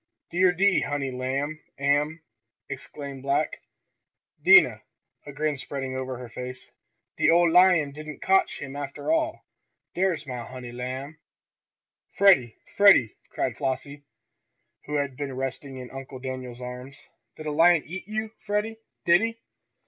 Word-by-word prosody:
"Dere 180 +1 +4
de 195 +2 +3
honey 145 -2 -2
lamb 135 +4 -2 0.2
am!" 145 +3 +1 0.4
exclaimed 140 0 -7
black 140 +1 -1 0.8
Dinah, - - +7 0.5
a - - -6
grin 150 +1 -1
spreading 135 -1 -4
over 130 -1 -4
her 125 0 -8
face. 125 +2 -8 0.5
"De - - +3
ole 170 0 +5
lion 180 -4 +5
didn't 155 +1 -9
cotch 195 0 +2
him 135 -1 -7
after 145 - -4
all. 320 0 0 0.5
Dere's 175 -4 0
mah 125 -3 -6
honey 125 -1 -8
lamb!" 130 +5 -6 1.0
"Freddie! 180 - +5 0.2
Freddie!" 200 - +6 0.2
cried - - -2
Flossie, 140 +2 -3 0.8
who 150 - -4
had 140 -2 -1
been 135 -1 -5
resting 135 +1 -5
in 125 -1 -9
Uncle 135 0 -8
Daniel's 130 -1 -6
arms, 125 +3 -9 0.3
"did 155 - -9
a 150 - -2
lion 165 +1 +5
eat 180 +5 -7
you, 215 +1 -3
Freddie? 210 +2 -1 0.3
Did 170 +2 +6
he?" 230 0 -2
145 Hz, 140 wpm, -26 LUFS, 130-170 Hz, 1.0 s, Dinah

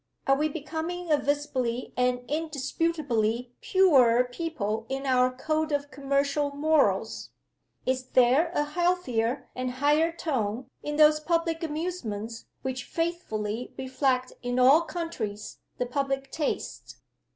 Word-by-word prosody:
Are 270 - +4
we 305 +2 +1
becoming 325 +3 -4
a 300 - +6
visibly 260 -4 -1
and 250 0 +1
indisputably 280 -6 -1
purer 260 -11 +5
people 245 -6 -3
in 270 +1 -3
our 255 -1 +4
code 310 +4 -1
of 285 0 -1
commercial 280 +1 0
morals? 310 0 +1 0.6
Is 255 0 0
there 255 +7 +4
a 295 - +3
healthier 295 -7 0
and 255 0 -2
higher 295 +5 +3
tone 255 -8 -2
in 295 - -3
those 305 0 +6
public 330 +1 0
amusements 295 - -4 0.2
which 260 -1 -3
faithfully 245 -10 -3
reflect 260 -1 0
in 245 0 -2
all 265 +6 +7
countries 295 - -5 0.2
the 250 - 0
public 270 +1 -2
taste? 305 -2 -3
275 Hz, 120 wpm, -27 LUFS, 250-315 Hz, 0.6 s, all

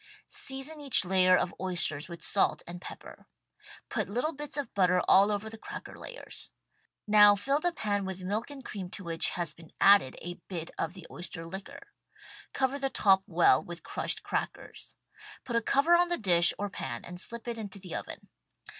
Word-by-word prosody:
Season 270 +3 -5
each 275 -8 +8
layer 185 0 +4
of 175 - -1
oysters 170 -4 0
with 170 -1 -9
salt 200 - +1
and 175 +1 -9
pepper. - - -11 0.6
Put - - -2
little 250 +10 -1
bits 295 0 -6
of 280 -5 -4
butter 180 -2 +3
all 195 +2 +6
over 205 +1 -2
the 220 0 -9
cracker - - -9
layers. - - -8 0.6
Now 210 -1 +7
fill 275 +8 0
the 350 +3 0
pan 205 -9 -1
with 190 -1 -6
milk 210 +7 -2
and 275 -3 -9
cream 190 -4 -6
to 195 - -8
which 165 -1 +1
has 170 -3 0
been 165 -1 -16
added 195 -10 +5
a 175 +1 -8
bit 170 -3 -6
of 165 +3 -3
the 185 -3 -11
oyster 175 -1 -5
liquor. 280 - -9 0.6
Cover 270 +1 -1
the 270 0 -1
top 195 -6 +4
well 170 0 +4
with 175 -3 -9
crushed - - -2
crackers. - - -5 0.5
Put 240 -3 -4
a 230 - +3
cover 280 +8 +3
on 350 +1 +5
the 345 0 0
dish 175 -4 +5
or 205 - -2
pan 130 -11 -6
and 180 0 -5
slip 235 0 -3
it 235 -1 -4
into 205 -2 -7
the 185 -3 -9
oven. - - -7
200 Hz, 190 wpm, -29 LUFS, 175-260 Hz, 0.6 s, each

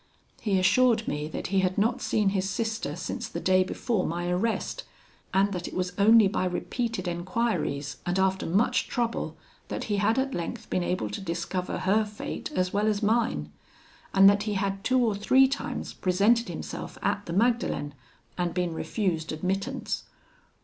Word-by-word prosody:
He 205 -4 +1
assured 220 +4 +3
me 150 +1 -2
that 155 - -5
he 195 - +4
had 185 -1 0
not 230 +5 +1
seen 210 -2 +2
his 195 -1 -1
sister 220 - -2
since 175 0 -4
the 170 - -5
day 185 +1 +4
before 210 +1 -1
my 175 +1 -2
arrest, 225 - -1 0.5
and 195 +1 +3
that 180 -1 -4
it - - -8
was 180 -1 -1
only 215 +2 +6
by 190 -1 -1
repeated 220 +2 -2
enquiries, 175 - -1
and 175 +1 -1
after 190 0 +1
much 200 +8 +2
trouble, 235 -1 -2 0.3
that - - -4
he 205 -2 -1
had 210 +4 +2
at 265 0 0
length 170 -1 -5
been 185 - +1
able 180 +1 -1
to 210 - -5
discover 180 +1 -3
her 210 +4 +2
fate 210 0 -6
as 185 0 0
well 205 +2 +2
as 215 0 0
mine; 210 - +1 0.6
and 195 0 +7
that 200 0 +5
he - - 0
had 195 0 -1
two 255 - +2
or 220 - +1
three 260 +7 +5
times 275 +2 -4
presented 205 +6 +2
himself - - -6
at 205 - -1
the 170 - -3
Magdalen, 220 - +1 0.5
and 175 -1 -1
been 180 -2 0
refused 165 -2 -2
admittance. 195 - -2
195 Hz, 175 wpm, -27 LUFS, 180-220 Hz, 0.6 s, and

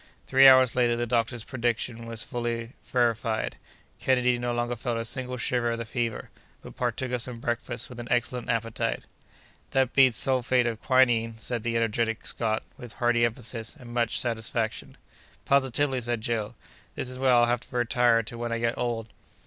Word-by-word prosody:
Three 135 +1 +7
hours 130 -2 +7
later, 120 -2 +2
the 120 - 0
doctor's 115 0 0
prediction 115 -2 -2
was 115 -1 -5
fully 120 -1 -3
verified. 115 -2 0 0.4
Kennedy 125 -2 +2
no 120 0 -1
longer 120 0 -1
felt 120 0 -3
a 115 - -3
single 125 +1 -3
shiver 120 0 0
of 115 - -1
the 115 - -4
fever, 115 0 -3 0.3
but - - -11
partook 125 +1 -2
of 125 -1 -1
some 120 0 -3
breakfast 120 +1 -2
with 125 -1 -10
an 120 - -6
excellent 125 0 0
appetite. 115 -1 -1 0.7
"That 130 -2 +1
beats 130 -4 +5
sulphate 130 -1 +2
of 115 -2 -2
quinine!" 120 -4 +3
said 120 +1 -3
the 115 0 -1
energetic 115 0 0
Scot, 110 -2 -1
with 120 -2 -10
hearty 120 -1 +2
emphasis 115 -1 -4
and 120 -1 -10
much 120 -2 +1
satisfaction. 115 -2 -2 0.5
"Positively," 135 -1 +2
said 120 -1 -2
Joe, 110 -2 -2 0.4
"this - - -3
is 130 0 -7
where 130 -1 +3
I'll 120 -1 +6
have 120 0 +1
to 125 - -7
retire 120 -1 +3
to 115 +2 -8
when 120 0 -3
I 115 - 0
get 115 0 -1
old!" 115 -2 -2
120 Hz, 180 wpm, -27 LUFS, 115-125 Hz, 0.7 s, Three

